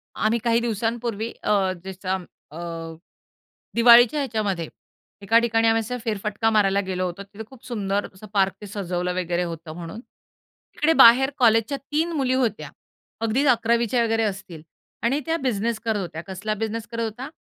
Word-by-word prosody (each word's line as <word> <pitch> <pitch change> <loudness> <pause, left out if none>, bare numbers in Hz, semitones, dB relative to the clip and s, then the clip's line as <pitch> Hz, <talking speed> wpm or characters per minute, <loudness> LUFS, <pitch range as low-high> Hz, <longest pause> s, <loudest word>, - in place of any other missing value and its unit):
आम्ही 225 +2 +1
काही 235 0 +3
दिवसांपूर्वी 230 0 -2
अ, 195 -3 +2
जसं 190 -1 -4 0.3
अ, 155 - -10 1.2
दिवाळीच्या 240 +4 +7
ह्याच्यामध्ये 205 - -2 0.5
एका 225 +3 +4
ठिकाणी 225 -1 +2
आम्ही 225 0 +3
असा 250 +3 -4
फेरफटका 210 0 -1
मारायला 200 -2 +3
गेलो 185 -1 -2
होतो. 180 +3 -6
तिथे 205 +2 -10
खूप 265 -1 -16
सुंदर 205 -4 -2
असं 200 +3 -12
पार्क 195 -1 +3
ते 205 - -8
सजवलं 180 -3 -3
वगैरे 180 -1 -1
होतं 165 -1 -7
म्हणून. 175 +5 -8
तिकडे 300 +4 -5
बाहेर 265 0 +7
कॉलेजच्या 230 +3 +3
3 310 +5 -2
मुली 265 -4 0
होत्या. 235 -5 -1 0.5
अगदीच 230 +6 +1
11वीच्या 235 0 +2
वगैरे 225 0 +1
असतील 190 -6 -5 0.4
आणि 270 +5 +1
त्या 325 - +1
बिझनेस 235 -5 -1
करत 220 -2 0
होत्या. 165 -3 -6
कसला 200 +3 -3
बिझनेस 225 +1 -4
करत 230 0 -2
होता? 240 +5 -5
220 Hz, 155 wpm, -23 LUFS, 195-235 Hz, 1.2 s, दिवाळीच्या